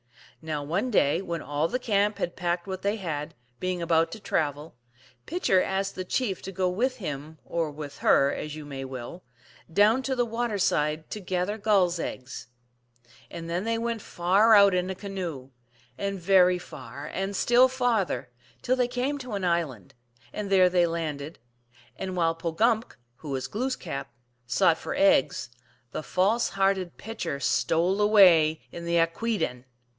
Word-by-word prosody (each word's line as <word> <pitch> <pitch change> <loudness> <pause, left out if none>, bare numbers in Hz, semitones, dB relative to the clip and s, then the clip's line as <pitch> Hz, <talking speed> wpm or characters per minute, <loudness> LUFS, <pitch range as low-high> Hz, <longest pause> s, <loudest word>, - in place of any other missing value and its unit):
Now, 155 -2 -3
one 175 - -1
day 165 - +2
when 170 -4 -4
all 145 +2 0
the 250 - -1
camp 210 -4 +1
had 175 - -3
packed 175 -1 -1
what 190 -1 -5
they 200 +2 0
.had, 155 -8 -4 0.2
being 185 -1 -2
about 165 0 +2
to 225 - -7
travel, 150 -5 -2 0.5
Pitcher 305 - +2
asked 195 +1 -1
the 185 - -4
chief 195 0 -1
to 195 - -6
go 185 0 0
with 250 +8 0
him, 155 - -6
or 165 -2 -1
with 145 -1 -8
her, 140 +1 +4
as 150 0 -5
you 155 -1 -8
may 135 -2 -6
will, 130 +6 -7 0.5
down 210 +8 +4
to 265 0 -2
the 245 -1 +1
water 230 -1 -2
side 155 -4 0
to 215 - -4
gather 185 +2 -2
gulls 190 -5 +2
eggs. 130 -4 -6 0.8
And 165 -1 -7
then 175 +3 -2
they 230 0 0
went 230 -1 -2
far 200 +7 +4
out 200 -1 +7
in 180 0 0
a 190 - -3
canoe, 180 -10 -6 0.5
and 200 -1 -2
very 180 0 +5
far, 135 -4 -9
and 195 +2 -2
still 245 +5 +5
farther, 245 - -1 0.3
till 255 - +2
they 250 -1 +1
came 255 +4 -2
to 250 -4 -7
an 200 -2 -2
island, 160 - -1 0.4
and 210 -2 -4
there 185 -2 +5
they 175 -1 +3
landed, 155 -2 -4 0.6
and 185 +3 -5
while 165 -1 +2
Pogumk 210 +8 0 0.2
(who 150 - -9
was 135 -2 -2
Glooskap) 225 - -3 0.4
sought 145 +6 +3
for - - -4
eggs, 130 -9 +3 0.4
the - - -4
false 200 +9 +1
hearted 195 -2 0
Pitcher 220 -10 -5
stole 175 +7 +1
away 175 -7 +6
in 170 - -7
the 170 0 0
akwSden 165 - 0
(P. 125 - -25
180 Hz, 170 wpm, -27 LUFS, 160-210 Hz, 0.8 s, out